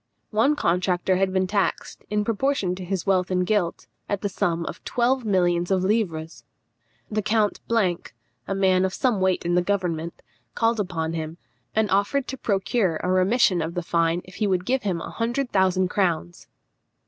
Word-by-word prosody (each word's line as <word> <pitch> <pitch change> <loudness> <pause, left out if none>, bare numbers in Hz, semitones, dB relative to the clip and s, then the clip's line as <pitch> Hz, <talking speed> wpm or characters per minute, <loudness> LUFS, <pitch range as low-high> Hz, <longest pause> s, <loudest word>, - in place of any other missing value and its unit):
One 235 +8 +3
contractor 180 -3 +1
had 190 0 +1
been 185 0 +1
taxed, 200 +1 -2
in 210 0 0
proportion 230 -4 0
to 185 0 -6
his 185 -1 -3
wealth 185 -2 +2
and 180 -1 +1
guilt, 190 -4 0 0.2
at 200 -2 -1
the 205 - -1
sum 170 -3 -1
of - - -7
twelve 250 +1 +1
millions 175 -3 +2
of 190 -1 +2
livres. 180 -6 -1 0.7
The 215 0 0
Count, 210 0 +1
a 195 -2 -2
man 190 -1 +3
of 190 0 -1
some 240 -7 +1
weight 185 -2 +1
in 175 - +1
the 180 - +4
government, 175 -4 -2 0.3
called 230 -1 +1
upon 165 -5 -2
him, 160 0 -4 0.4
and 220 0 +3
offered 205 +8 +1
to 265 - -4
procure 195 -3 0
a 180 - 0
remission 185 0 +3
of 165 +2 -4
the 175 - -2
fine 170 +1 +1
if 185 - -13
he 215 - +1
would 185 -2 0
give 260 +3 +1
him 185 -5 -2
a - - -6
hundred 240 +3 -2
thousand 185 -1 +2
crowns. 170 - -1
190 Hz, 180 wpm, -24 LUFS, 175-210 Hz, 0.7 s, the